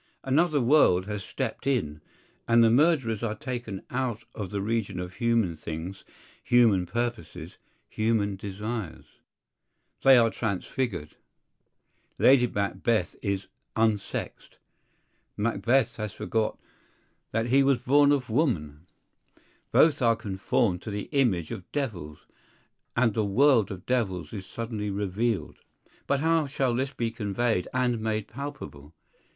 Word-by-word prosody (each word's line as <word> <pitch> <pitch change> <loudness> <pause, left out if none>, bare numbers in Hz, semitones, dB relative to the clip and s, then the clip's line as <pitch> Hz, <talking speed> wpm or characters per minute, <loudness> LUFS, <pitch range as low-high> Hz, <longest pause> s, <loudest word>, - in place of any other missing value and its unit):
Another 150 +3 +2
world 120 -9 +4
has 105 -1 -4
stepped 130 +4 -4
in; 75 - -1 0.5
and 115 0 +5
the 115 - +5
murderers 130 -5 +2
are 110 -2 -2
taken 120 -5 -5
out 125 -3 -2
of 100 -4 -5
the 100 - -3
region 100 -2 -2
of 90 0 -6
human 115 -7 +1
things, 80 +5 -7 0.4
human 110 -7 +4
purposes, 115 -7 -4 0.3
human 110 -2 0
desires. 100 -1 -5 1.0
They 135 -1 +7
are 115 -2 +4
transfigured: 100 - -3 1.0
Lady 125 -2 +5
Macbeth 100 0 -1
is 100 -1 -2 0.3
"unsexed;" 110 -3 -2 0.8
Macbeth 115 +3 +1
has 105 -3 -4
forgot 110 -1 -1 0.7
that 115 +2 -1
he 135 +3 +5
was 135 -1 +3
born 140 +4 +4
of 140 -3 +1
woman; 90 - -1 0.8
both 155 -4 +4
are 115 -2 +4
conformed 95 -2 -1
to - - -7
the 105 -1 -5
image 115 - +1
of 90 - -8
devils; 90 - -4 0.7
and 120 -2 +3
the 110 - 0
world 115 +1 +4
of 95 -2 -8
devils 105 -9 -1
is 95 -3 -7
suddenly 110 -3 -4
revealed. 100 +3 -2 0.5
But 140 0 +1
how 160 -1 +2
shall 130 -2 0
this 130 +3 -1
be 115 -4 -2
conveyed 110 -2 -1
and 125 -2 0
made 110 -1 -2
palpable? 115 - -8
110 Hz, 125 wpm, -27 LUFS, 100-125 Hz, 1.0 s, They